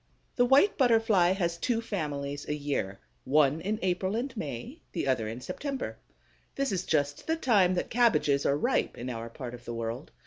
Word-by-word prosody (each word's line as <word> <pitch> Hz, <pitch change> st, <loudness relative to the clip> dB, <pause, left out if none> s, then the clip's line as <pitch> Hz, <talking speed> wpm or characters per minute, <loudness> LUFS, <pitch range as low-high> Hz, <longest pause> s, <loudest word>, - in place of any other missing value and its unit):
The 245 Hz, -, +4 dB
White 285 Hz, +11 st, +5 dB
Butterfly 225 Hz, -8 st, +4 dB
has 170 Hz, -3 st, -1 dB
two 240 Hz, +2 st, +1 dB
families 145 Hz, -10 st, -4 dB
a 150 Hz, -, 0 dB
year: 140 Hz, -10 st, -2 dB, 0.3 s
one 150 Hz, +2 st, +3 dB
in 215 Hz, +2 st, -1 dB
April 185 Hz, +2 st, 0 dB
and 250 Hz, +4 st, -3 dB
May, 210 Hz, -, -6 dB
the -, -, -2 dB
other 125 Hz, -5 st, +1 dB
in 115 Hz, +3 st, -6 dB
September. 275 Hz, -, -4 dB, 0.6 s
This 275 Hz, -4 st, 0 dB
is 185 Hz, -1 st, -2 dB
just 145 Hz, -2 st, 0 dB
the 320 Hz, -, +2 dB
time 205 Hz, -, +3 dB
that 175 Hz, -, -2 dB
cabbages 220 Hz, -, +3 dB
are 140 Hz, -, +2 dB
ripe -, -, 0 dB
in 125 Hz, +2 st, -4 dB
our 115 Hz, 0 st, -5 dB
part 125 Hz, 0 st, -7 dB
of 120 Hz, 0 st, -10 dB
the 120 Hz, -1 st, -5 dB
world. 115 Hz, +4 st, -4 dB
170 Hz, 185 wpm, -29 LUFS, 140-225 Hz, 0.6 s, White